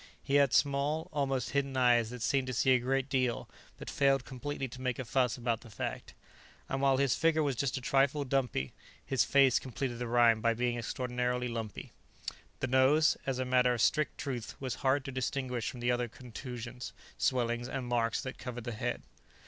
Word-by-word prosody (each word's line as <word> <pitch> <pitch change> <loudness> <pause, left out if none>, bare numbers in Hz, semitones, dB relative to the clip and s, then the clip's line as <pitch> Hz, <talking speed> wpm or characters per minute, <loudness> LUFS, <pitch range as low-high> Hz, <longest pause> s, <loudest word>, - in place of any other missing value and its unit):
He 135 - -3
had 140 -3 +3
small, 145 +3 +1
almost 135 -4 -1
hidden 140 -1 -1
eyes 120 -3 +4
that 125 -1 -6
seemed 135 -2 +1
to 130 - -3
see 130 +2 +3
a 130 - +5
great 135 +2 0
deal, 130 -3 0 0.3
but - - -9
failed 135 -2 +2
completely 135 +1 -4
to 125 +1 -10
make 125 -1 -1
a 130 - -4
fuss 125 0 +1
about 120 -2 -1
the 120 - -13
fact. 105 - -5 0.5
And 135 - -2
while 135 -1 +4
his 140 -2 +3
figure 160 -1 +2
was 140 -3 0
just 135 +2 -1
a - - -5
trifle 140 +3 +2
dumpy, 125 - -1 0.3
his 135 - +2
face 135 -3 +4
completed 125 -1 -4
the 120 - -3
rhyme 115 -2 +4
by 115 0 +2
being 120 +1 0
extraordinarily 125 +1 -2
lumpy. 115 -3 -5 0.7
The - - +1
nose, 130 +5 +4
as 135 -2 0
a 130 - -1
matter 125 -1 +3
of 115 - -2
strict 150 -1 +1
truth, 125 -5 -4
was 130 -2 -3
hard 135 +1 +2
to 135 - -4
distinguish 130 -2 -2
from 125 - -8
the 120 +1 +2
other 120 0 0
contusions, 125 +1 -8 0.3
swellings 120 -1 0
and 130 -2 -3
marks 120 -2 0
that 130 - -7
covered 125 -2 -6
the 120 - -4
head. 120 +2 -3
125 Hz, 195 wpm, -31 LUFS, 120-135 Hz, 0.7 s, a